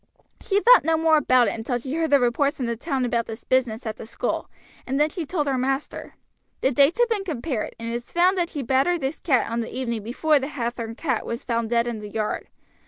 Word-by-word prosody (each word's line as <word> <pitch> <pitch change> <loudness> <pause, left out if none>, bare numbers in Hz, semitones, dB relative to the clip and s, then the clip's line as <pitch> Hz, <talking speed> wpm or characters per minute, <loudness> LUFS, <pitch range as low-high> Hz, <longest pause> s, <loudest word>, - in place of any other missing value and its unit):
"She 400 0 +1
thought - - +7
no 320 +1 +2
more 320 -1 +4
about 255 -5 +4
it - - +1
until 235 +2 -2
she 260 +3 -6
heard 325 0 0
the 285 - +5
reports 275 +5 +1
in 255 - -1
the 235 0 -1
town 265 +1 -2
about 235 -1 -1
this 225 +1 -8
business 245 -3 0
at 220 -1 -4
the 220 - -9
school, - - -3 0.4
and 270 +2 -1
then 300 +1 +3
she 335 -4 -5
told 305 -2 -1
her 270 -2 0
master. 270 +2 -3 0.5
The 265 - +2
dates 280 - +4
have 485 - +5
been 425 -4 0
compared, 280 - -3
and 230 - -5
it 230 - -3
is 240 0 -6
found 360 +3 +3
that 350 -2 0
she 290 -3 -4
battered 270 +8 +2
this 270 +3 -3
cat 260 -8 +1
on 230 - -1
the 230 - -3
evening 235 -4 -3
before 285 +7 +2
the 270 - -4
Hathorn 235 -5 -4
cat 260 -5 -1
was 235 +1 -5
found 230 -2 -1
dead 235 0 +2
in 235 -2 -4
the 210 0 -8
yard. 215 0 -3
260 Hz, 245 wpm, -24 LUFS, 235-310 Hz, 0.5 s, thought